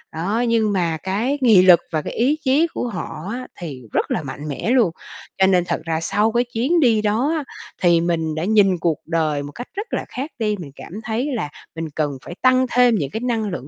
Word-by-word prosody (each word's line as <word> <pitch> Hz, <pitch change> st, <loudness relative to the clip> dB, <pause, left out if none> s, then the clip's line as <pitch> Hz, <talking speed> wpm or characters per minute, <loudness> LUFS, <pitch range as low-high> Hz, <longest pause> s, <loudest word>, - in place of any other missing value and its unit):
Đó, 205 Hz, +9 st, 0 dB
nhưng 225 Hz, -2 st, +2 dB
mà 170 Hz, -4 st, 0 dB
cái 225 Hz, +9 st, 0 dB
nghị 220 Hz, -7 st, +7 dB
lực 180 Hz, -2 st, +7 dB
và 155 Hz, -1 st, 0 dB
cái -, -, -6 dB
ý 270 Hz, +7 st, +2 dB
chí 290 Hz, +5 st, +3 dB
của 245 Hz, -, -4 dB
họ 180 Hz, -4 st, -6 dB
á 255 Hz, +1 st, -5 dB
thì 140 Hz, -8 st, -7 dB
rất -, -, 0 dB
là 155 Hz, -, -1 dB
mạnh 145 Hz, +2 st, -7 dB
mẽ 145 Hz, -, -3 dB
luôn. 235 Hz, -10 st, +4 dB, 0.5 s
Cho 190 Hz, 0 st, +4 dB
nên 180 Hz, -2 st, +3 dB
thật -, -, -2 dB
ra 160 Hz, -1 st, -1 dB
sau 210 Hz, +6 st, +1 dB
cái 240 Hz, +1 st, +2 dB
chuyến 270 Hz, +10 st, +2 dB
đi 230 Hz, -6 st, +4 dB
đó 225 Hz, +9 st, +1 dB
á 300 Hz, -, -2 dB, 0.4 s
thì 170 Hz, -2 st, +4 dB
mình 160 Hz, -2 st, -1 dB
đã 160 Hz, -, -2 dB
nhìn 200 Hz, -4 st, +4 dB
cuộc 160 Hz, -2 st, +1 dB
đời 155 Hz, -3 st, 0 dB
một 145 Hz, -, -8 dB
cách 245 Hz, +8 st, -8 dB
rất 415 Hz, +4 st, -4 dB
là -, -, -1 dB
khác 275 Hz, +5 st, -5 dB
đi, 210 Hz, -2 st, +1 dB
mình 145 Hz, -5 st, -8 dB
cảm 170 Hz, -, -11 dB
thấy 235 Hz, +6 st, -2 dB
là 150 Hz, -10 st, -3 dB, 0.3 s
mình 160 Hz, -1 st, -4 dB
cần 150 Hz, -2 st, 0 dB
phải 175 Hz, -, -7 dB
tăng 255 Hz, 0 st, +4 dB
thêm 245 Hz, -2 st, +4 dB
những 145 Hz, -8 st, -1 dB
cái 220 Hz, -, -3 dB
năng 230 Hz, -4 st, -1 dB
lượng 160 Hz, -6 st, -6 dB
205 Hz, 235 wpm, -21 LUFS, 165-240 Hz, 0.5 s, nghị